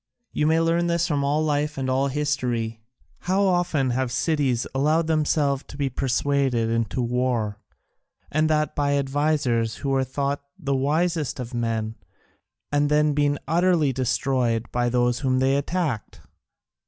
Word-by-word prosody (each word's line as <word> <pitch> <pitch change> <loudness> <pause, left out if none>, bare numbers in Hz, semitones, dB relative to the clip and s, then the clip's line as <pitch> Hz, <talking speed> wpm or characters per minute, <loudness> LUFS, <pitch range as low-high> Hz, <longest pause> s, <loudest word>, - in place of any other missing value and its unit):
You 150 - 0
may 160 +1 +3
learn 165 +1 +1
this 170 0 +1
from 145 -3 0
all 145 +3 +1
life 150 0 -1
and 135 -1 -2
all 130 +2 +1
history. 125 -6 -2 0.4
How 190 +3 +1
often 175 -8 +1
have 130 0 -1
cities 135 -4 0
allowed 155 +5 +2
themselves 150 -3 +1
to 140 - -10
be 140 -2 -1
persuaded 130 -2 0
into 115 +2 -1
war, 120 -4 -1 0.7
and 155 +1 +2
that 155 -1 +1
by 145 -1 +1
advisers 135 -5 0
who 140 - -4
were 135 -1 +2
thought 140 +2 -2 0.2
the 140 -7 -1
wisest 155 +2 0
of 125 0 -6
men, 115 -2 -2 0.7
and 145 0 +2
then 150 0 +3
been 145 0 +1
utterly 165 -3 +2
destroyed 125 -2 0
by 120 0 +1
those 120 0 +1
whom 130 -2 +1
they 135 +1 +2
attacked! 140 - -2
140 Hz, 150 wpm, -24 LUFS, 125-150 Hz, 0.7 s, may